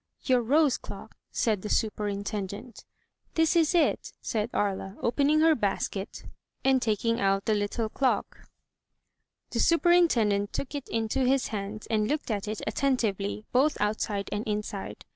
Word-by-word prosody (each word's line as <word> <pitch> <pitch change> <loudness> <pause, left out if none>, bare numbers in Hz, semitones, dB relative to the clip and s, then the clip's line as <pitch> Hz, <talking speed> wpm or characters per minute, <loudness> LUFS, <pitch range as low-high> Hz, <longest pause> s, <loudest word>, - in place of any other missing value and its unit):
"Your 255 -2 +3
rose 280 +3 +3
clocjc?" - - -9 0.2
said 215 -5 0
the 210 - -5
superintendent. 205 +1 -3 0.5
"This 325 +2 +3
is 330 +1 +3
it," 335 - +1
said 215 0 -2
Aria, 195 0 -2
opening 285 +5 +2
her 320 0 +6
basket 200 -4 -2 0.4
and 265 -1 +4
taking 230 +1 0
out 195 0 +2
her 220 - +3
little 210 +2 -1
clock. 260 +4 -1 1.0
The - - -2
superintendent 285 - +3
took 275 - -4
it 285 -2 -5
into 225 +2 -1
his 265 +1 +2
hands 210 0 -5
and 215 -1 0
looked 295 -3 -2
at 205 -1 -2
it 215 0 -4
attentively, 215 -4 -1
both 275 +5 +2
outside 210 -1 -1
and 205 +1 -2
inside. 210 -1 -4
220 Hz, 145 wpm, -28 LUFS, 205-270 Hz, 1.0 s, her